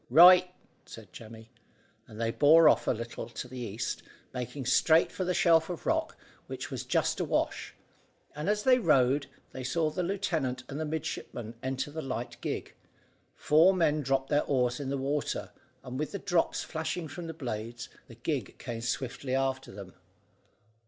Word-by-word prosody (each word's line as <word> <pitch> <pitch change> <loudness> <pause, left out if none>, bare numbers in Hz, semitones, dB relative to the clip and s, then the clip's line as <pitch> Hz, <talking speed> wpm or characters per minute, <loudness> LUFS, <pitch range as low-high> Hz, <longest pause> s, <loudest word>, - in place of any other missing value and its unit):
"Right," 180 +6 +8 0.4
said 105 -5 -12
Jemmy, 110 0 -12 0.6
and 110 - -11
they 115 0 0
bore 155 +5 +6
off - - +4
a - - +4
little 115 0 -5
to 120 +1 -7
the 130 0 -8
east, 115 -2 -4 0.3
made 125 +1 -5
straight 160 +5 +4
for 185 - -3
the 180 0 -1
shelf 165 -1 +4
of 175 -3 -6
rock, - - 0 0.3
which - - -6
was - - -4
just - - 0
awash; - - -1 0.6
and 150 +6 -2
as 210 0 +1
they 255 -1 +5
rowed, 140 - +3 0.2
they 130 - -7
saw 155 +4 0
the 170 - -2
lieutenant 165 -9 -1
and 140 +1 -6
the 160 - -2
midshipman 125 -7 -5
enter 135 +2 -3
the 160 +2 -5
light 125 -3 -5
gig, - - -4 0.6
four 165 +6 +5
men 155 -4 +2
dropped 135 -1 0
their 145 0 +3
oars 125 -2 +1
in 140 -2 -4
the 140 - -1
water, 140 +2 -2 0.3
and 130 +1 -6
with 150 - -3
the - - -2
drops 175 -3 0
flashing 160 +1 -4
from 165 +4 -7
the - - -4
blades, 115 -3 -5 0.2
the - - -13
gig - - -3
came 115 -1 -6
swiftly 125 +2 -3
after 135 0 -1
them. 95 -2 -10
135 Hz, 170 wpm, -29 LUFS, 125-160 Hz, 0.6 s, Right